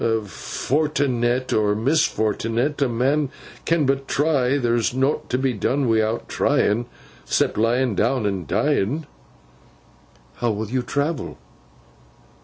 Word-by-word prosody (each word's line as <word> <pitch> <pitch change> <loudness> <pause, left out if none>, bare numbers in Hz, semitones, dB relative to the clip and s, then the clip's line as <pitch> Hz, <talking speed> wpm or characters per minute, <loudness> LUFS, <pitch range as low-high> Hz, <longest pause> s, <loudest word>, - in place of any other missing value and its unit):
Fortnet 125 - 0
or 105 -1 +2
misfortnet, 120 0 0
a 135 - +3
man 135 +5 +1 0.4
can 165 -3 +2
but 135 0 0
try; 140 -3 +2
there's 120 -2 0
nowt 135 +3 0
to 125 - +1
be 130 -1 0
done 130 +5 0
wi'out 110 0 +1
tryin'—cept 115 +4 -1
laying 120 +2 +1
down 115 +4 +1
and 95 -6 -2
dying.' 140 - 0 1.3
'How 120 - 0
will 110 0 -3
you 130 0 +1
travel? 140 +4 -2
125 Hz, 110 wpm, -22 LUFS, 115-140 Hz, 1.3 s, a